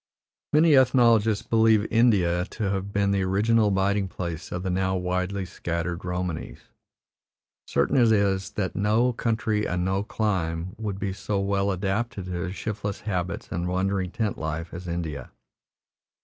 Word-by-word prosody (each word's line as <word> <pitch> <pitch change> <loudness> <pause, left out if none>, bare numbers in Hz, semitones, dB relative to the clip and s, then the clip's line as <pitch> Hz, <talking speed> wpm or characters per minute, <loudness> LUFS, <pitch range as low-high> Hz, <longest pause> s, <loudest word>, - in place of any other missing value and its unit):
Many 155 0 +5
ethnologists 115 -5 +4
believe 110 -2 +4
India 95 -7 +3
to 100 -1 -3
have 100 0 -3
been 100 -1 +1
the 100 -1 +1
original 105 +4 +2
abiding 100 0 +1
place 85 -2 -6
of 90 +1 -3
the 95 - -1
now 95 +1 0
widely 90 +1 -1
scattered 85 0 -4
Romanies; 90 -2 -4 1.1
certain - - +1
it 120 -3 +5
is 100 -2 +2
that 95 -3 -2
no 110 +5 +2
country 110 -2 0
and 90 0 -1
no 95 +1 0
clime 95 -5 -2
would 105 -3 -3
be 100 -1 -3
so 100 +1 -2
well 100 0 0
adapted 100 +2 -2
to 90 - -6
their 90 +1 -3
shiftless 100 0 -4
habits 90 -4 -3
and 85 +1 -2
wandering 95 +1 0
tent 105 +3 -2
life 80 +1 -4
as 90 +1 -7
India. 80 -6 -4
95 Hz, 150 wpm, -25 LUFS, 90-105 Hz, 1.1 s, Many